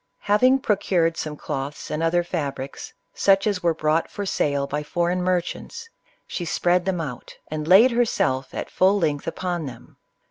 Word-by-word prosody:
Hav 205 +1 +2
ing 255 +1 +6
procured 185 -8 +1
some 150 -2 -5
cloths 140 -1 -5
and 155 +1 -2
other 170 +1 +2
fabrics, 140 -6 -5 0.2
such 195 0 +3
as 200 -4 0
were 170 -2 +1
brought 155 +1 +1
for 205 - -5
sale 140 -6 0
by 145 +1 -3
foreign 175 +3 -1
merchants, 185 - -2 0.4
she 175 - -5
spread 175 +2 +1
them 190 -2 -1
out, 135 -7 -6
and 155 0 -4
laid 205 +9 +7
herself 220 - 0
at - - -5
full 190 +2 +3
length 150 -6 -1
upon 175 -2 -3
them. 130 - -12
175 Hz, 170 wpm, -23 LUFS, 150-190 Hz, 0.4 s, laid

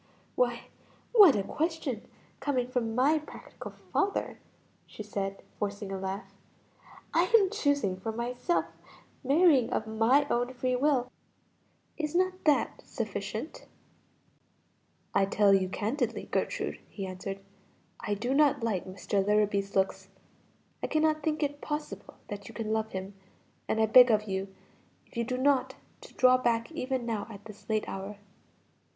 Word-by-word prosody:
"Why - - +1 0.5
what 405 - +9
a 200 - 0
question 305 - -2 0.4
coming 265 -3 0
from 235 -3 -2
my 285 +5 +4
practical 305 - -10
father!" 400 0 -2 0.5
she 215 - -8
said, 195 -1 -4 0.2
forcing 205 -1 -3
a 195 - -3
laugh. 190 +2 -5 0.8
"I - - +4
am 395 -3 +2
choosing 285 - 0
for 220 +4 -3
myself, 245 +9 -1 0.6
marrying 280 -2 +4
of 220 - -1
my 225 +6 +3
own 245 0 -1
free 255 0 0
will; 255 -2 +1 0.9
is 305 0 -3
not 370 +1 +1
that 300 -2 +2
sufficient?" - - -5 1.5
"I 195 - +4
tell 200 0 +4
you 190 -1 +3
candidly, 230 +4 -2
Gertrude," - - -1
he 195 - -5
answered, 190 +1 -5 0.6
"I 210 -3 -2
do 240 +6 -1
not 285 -3 +3
like 210 -6 -1
Mr. 195 +1 -1
Larrabee's 205 -1 +1
looks. 190 0 0 0.7
I - - -1
cannot 310 0 +2
think 310 +1 -1
it 290 0 -2
possible 295 -10 -5
that 205 -1 -7
you - - -11
can 220 -2 -2
love 220 0 0
him, 190 +1 -5 0.5
and 220 - 0
I 220 - +5
beg 245 +3 +8
of 215 -2 +3
you 195 -1 -3 0.6
if - - -23
you 235 - 0
do 250 +2 -2
not, 265 -1 +2 0.3
to - - -13
draw 255 0 +5
back 235 +1 0
even 260 -5 -2
now 220 -3 -2
at 205 -1 -11
this 210 -1 -13
late 215 -1 0
hour." 195 +2 -6
235 Hz, 145 wpm, -29 LUFS, 205-285 Hz, 1.5 s, what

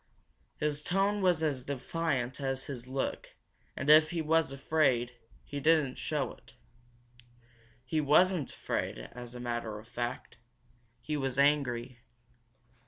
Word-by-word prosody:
His 150 -1 -1
tone 195 +5 +1
was 175 -4 +3
as 140 -5 0
defiant 135 -2 -2
as 135 -1 -1
his 125 -3 -7
look 135 +1 -3 0.4
and 140 - -3
if 155 +1 +8
he 170 - -2
was 160 -1 +2
afraid, 135 -4 +1 0.3
he 145 - -5
didn't 150 -3 +3
show - - -1
it. - - -20 1.3
He 155 +3 0
wasn't 160 +2 +3
afraid, - - -3
as 120 - -9
a - - -6
matter 120 -3 -3
of 110 +2 -12
fact. 120 0 -5 0.6
He 150 +5 -3
was 135 -3 -2
angry. 130 -4 +2
140 Hz, 130 wpm, -31 LUFS, 125-155 Hz, 1.3 s, if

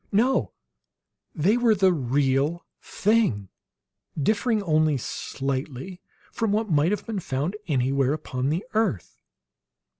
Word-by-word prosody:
No; 240 +6 +2 0.8
they 190 +9 +3
were 235 -3 +4
the 190 -2 +4
real 140 +3 0 0.2
thing, 200 - +1 0.7
differing 215 - +1
only 155 -4 +2
slightly 135 - -4 0.3
from 225 -3 -1
what 215 -1 0
might 150 +2 +3
have 205 0 -2
been 220 -4 -3
found 150 +4 -2
anywhere 135 -2 +1
upon 135 -3 -3
the 165 +6 -1
earth. 215 - -1
160 Hz, 115 wpm, -25 LUFS, 135-210 Hz, 0.8 s, were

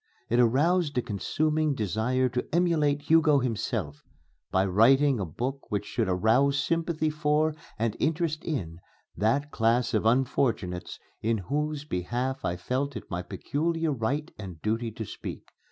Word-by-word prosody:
It 120 - +2
aroused 145 +6 +3
a - - +3
consuming 150 - 0
desire 115 +4 0
to 125 +1 -3
emulate 155 -4 +2
Hugo 160 -2 +5
himself, 110 - -2 0.5
by 95 +1 +2
writing 125 +7 +4
a 95 - -2
book 130 - -4
which 105 -1 -2
should 110 -2 -1
arouse 115 +10 +3
sympathy 165 -1 0
for 150 0 +1 0.2
and 110 -1 -1
interest 160 0 0
in 85 - -3 0.4
that 140 +8 +1
class 115 +2 +2
of - - +2
unfortunates 115 -7 0 0.2
in 115 +1 +1
whose 150 - -2
behalf 125 +5 -2
I 90 - -1
felt 130 +9 -2
it 110 - -8
my 90 0 -2
peculiar 160 - -1
right 140 +7 -2
and 95 -6 -8
duty 115 +2 -1
to 110 +1 -6
speak. - - -7
130 Hz, 145 wpm, -27 LUFS, 110-150 Hz, 0.5 s, Hugo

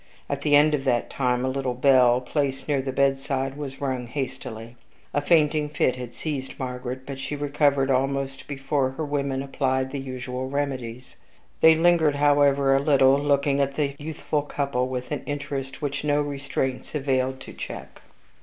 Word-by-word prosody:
At 140 0 -3
the 145 -1 +4
end 150 +1 +5
of 140 -2 0
that 120 -2 +1
time, 125 -1 0
a - - 0
little 130 -1 -2
bell, 125 -1 +5
placed 135 0 -2
near 145 -3 +1
the 135 0 -3
bedside, 135 0 0
was 140 -2 -6
rung 130 -3 -2
hastily. 120 -3 -6 0.4
A 145 - +1
fainting 150 -1 +3
fit 145 -4 +1
had 125 -1 -8
seized 140 -4 -4
Margaret; 125 0 -4
but 135 -1 -6
she 145 - -4
recovered 145 -1 +1
almost 135 +1 -1
before 135 -1 -1
her 160 - -2
women 140 -2 -1
applied 130 -1 -1
the 140 - -3
usual 130 -1 -5
remedies. 130 -4 -4 0.4
They 160 0 +7
lingered, 165 -3 +4
however, 140 -1 +4
a - - +4
little, 135 -1 +4
looking 140 -1 +2
at 140 0 0
the 140 -2 0
youthful 150 0 -2
couple 140 -3 -1
with 125 -1 -5
an - - -2
interest 140 -1 -4
which 145 0 -2
no 145 -1 +2
restraints 140 -1 -3
availed 130 -2 0
to - - -10
check. - - -8
135 Hz, 170 wpm, -25 LUFS, 130-145 Hz, 0.4 s, They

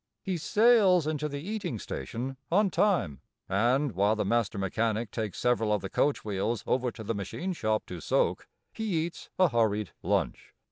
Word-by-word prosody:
He 185 -2 -1
sails 205 -2 +4
into 150 -1 -1
the 140 0 -5
eating 205 - -3
station 120 - -5 0.2
on 200 +2 +3
time, 165 - +1 0.3
and, 120 +8 +2
while 100 +3 +2
the 105 -1 -1
master 115 0 +1
mechanic 110 +3 -1
takes 110 -4 -4
several 115 -3 +1
of 105 -2 +1
the 95 - -5
coach 145 -5 +1
wheels 105 +2 -1
over 125 -1 +1
to 110 - -9
the 110 - -2
machine 110 - -4
shop 110 -8 -1
to 90 -2 -7
soak, - - 0 0.3
he 190 -8 -1
eats 170 - -9
a 185 -2 +5
hurried 105 -4 +1
lunch. - - -1
120 Hz, 175 wpm, -29 LUFS, 105-170 Hz, 0.3 s, a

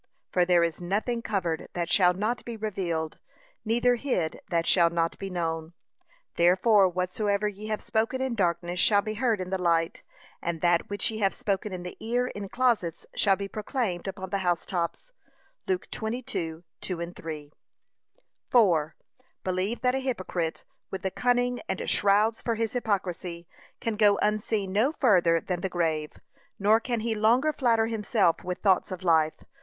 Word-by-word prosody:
'For 180 -1 +3
there 175 -1 +4
is 170 0 -2
nothing 215 +7 -1
covered 175 -8 -2
that 175 -1 -2
shall 180 0 +4
not 215 +6 -1
be 235 -1 -6
revealed; 175 -7 -3 0.4
neither 240 +2 +2
hid 205 - -1
that 170 -2 +1
shall 170 -2 +5
not 165 0 0
be 195 - -4
known. 165 -2 -3 0.6
Therefore 190 +3 +5
whatsoever 200 +3 0
ye 210 +1 -6
have 215 -1 -3
spoken 225 +3 0
in 260 -2 -1
darkness 175 -3 0
shall 205 +1 +4
be 215 - -3
heard 225 -1 +1
in 185 0 -5
the 190 - 0
light, 165 -1 +1 0.4
and 170 -1 -2
that 175 -1 +2
which 205 +2 0
ye 220 - -5
have 195 -2 +2
spoken 200 +1 -2
in 180 -1 -5
the 180 - -7
ear 245 +2 0
in 205 -5 -6
closets 230 -10 0
shall 195 -2 +4
be 200 +1 -5
proclaimed 210 -3 -3
upon 190 -1 -6
the 200 - 0
house 175 -3 0
tops.' 180 - -3 0.6
(Luke 375 -2 0
22:2,3) 170 - -5 1.0
4. 170 -10 +3 0.5
Believe 190 +5 -1
that 250 0 +2
a 265 - 0
hypocrite, 185 -10 -3 0.2
with 190 - -6
the 190 - -1
cunning 245 +4 +1
and - - -2
shrouds 210 +3 +3
for 230 - -1
his 225 -1 -2
hypocrisy, 180 -7 -2 0.3
can 225 -2 -2
go 205 -2 +5
unseen 210 -2 0
no 235 +9 +2
further 180 - +4
than 175 +1 -3
the 190 - -1
grave, 160 -4 -1 0.4
nor 210 +3 +4
can 235 -1 -2
he 230 0 0
longer 235 +8 +3
flatter 230 -5 +2
himself 215 -5 +1
with 180 0 -5
thoughts 190 -3 +3
of 185 -1 -6
life. 160 -3 +2
195 Hz, 165 wpm, -27 LUFS, 175-225 Hz, 1.0 s, shall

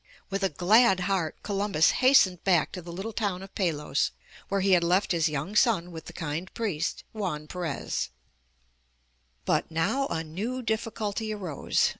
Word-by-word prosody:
With 195 +1 -1
a 195 - +2
glad 190 - +4
heart 180 -4 0
Columbus 200 -5 +2
hastened 225 -9 +5
back 175 -5 +3
to 180 - -6
the 170 0 -9
little 195 +6 -5
town 200 -4 -2
of 195 - -12
Palos 150 -7 0 0.4
where 195 0 +1
he 195 +1 +2
had 180 -2 +5
left 180 +4 +2
his 165 -2 +2
young 150 +7 -4
son 200 -7 +3
with 160 -1 -8
the - - -8
kind 165 +2 -4
priest, 185 -8 -2
Juan 180 -9 -3
Perez. 170 - -3
Ill 60 - -37 1.3
But - - +1
now 165 +13 0
a 160 - -2
new 215 +11 -4
difficulty 220 -1 -2
arose. 185 -9 0
185 Hz, 165 wpm, -27 LUFS, 165-210 Hz, 1.3 s, hastened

